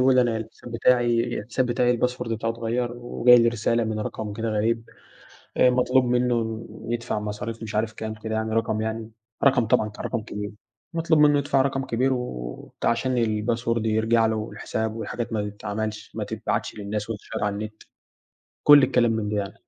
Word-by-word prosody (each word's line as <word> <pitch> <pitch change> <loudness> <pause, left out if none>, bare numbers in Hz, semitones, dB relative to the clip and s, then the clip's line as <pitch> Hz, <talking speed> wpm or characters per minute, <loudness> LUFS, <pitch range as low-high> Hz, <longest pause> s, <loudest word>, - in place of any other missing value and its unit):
بيقول 130 +1 +5
لي: 125 - +6
"أنا 115 -2 0
الحساب 110 +2 -8
بتاعي 120 0 +2
الحساب 120 +4 -1
بتاعي 120 0 +2
الباسورد 125 -1 0
بتاعه 115 +1 -1
اتغيّر، 115 +1 -2
وجاي 120 0 +5
لي 115 0 +4
رسالة 115 0 +1
من 110 0 -2
رقم 105 0 -4
كده 115 +2 -3
غريب." 115 +2 0 0.7
آآ 125 - +6
مطلوب 125 +1 +3
منه 120 -2 0 0.2
يدفع 120 -2 -2
مصاريف 105 +2 -5
مش 105 -1 -6
عارف 110 +1 0
كام 110 0 -5
كده 110 0 -5
يعني 110 0 -1
رقم 110 -1 0
يعني 110 0 -4 0.3
رقم 135 -4 +4
طبعًا 110 0 +2
كان 105 - -8
رقم 115 -3 -2
كبير. 105 -1 -6 0.4
مطلوب 165 -1 +2
منه 145 -1 +6
يدفع 140 -1 +2
رقم 135 0 -1
كبير 130 +2 +1
وبتاع 60 - -4
عشان 125 +2 0
الباسورد 115 0 0
يرجع 110 +1 +3
له 110 0 +1
والحساب 110 0 -3
والحاجات 115 +1 -4
ما 105 -1 -1
تتعملش 105 +1 -5
ما - - -2
تتبعتش - - -3
للناس 105 +1 -4
وتتشير 105 -2 -4
على 105 -1 0
النت. 110 +1 -7 0.8
كُل 145 -1 +8
الكلام 120 -2 +3
من 110 -2 -1
ده 105 - -1
يعني. 100 -1 -3
115 Hz, 180 wpm, -25 LUFS, 110-120 Hz, 0.8 s, كُل